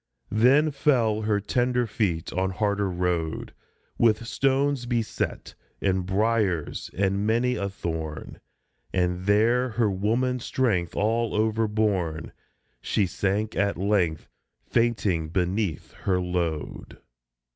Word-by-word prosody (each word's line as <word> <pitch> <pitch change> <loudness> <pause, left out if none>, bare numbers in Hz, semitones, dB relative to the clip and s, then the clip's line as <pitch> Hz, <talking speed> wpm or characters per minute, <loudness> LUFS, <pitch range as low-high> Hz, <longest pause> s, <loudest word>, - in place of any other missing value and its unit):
Then 135 +8 +4
fell 125 -6 +2
her 105 -1 +1
tender 125 +4 +1
feet 100 -7 -2
on 95 +1 0
harder 100 +1 0
road, 90 -3 -2 0.5
With 115 0 +3
stones 135 +1 +1
beset 120 -2 -2 0.3
and 95 -2 0
briers 100 -5 0
and 100 +1 +1
many 120 +3 +2
a 100 - -2
thorn; 80 -6 -5 0.5
And 90 0 -1
there, 115 +5 +3
her 110 -2 +1
woman's 120 +6 0
strength 95 -10 0
all 115 +2 0
overborne, 105 -7 0 0.5
She 100 - +1
sank 100 +4 -1
at 100 0 +1
length, 90 -5 0 0.4
fainting 100 -9 +1
beneath 90 0 -1
her 95 -2 -1
load. 90 -4 -3
105 Hz, 110 wpm, -26 LUFS, 90-115 Hz, 0.5 s, Then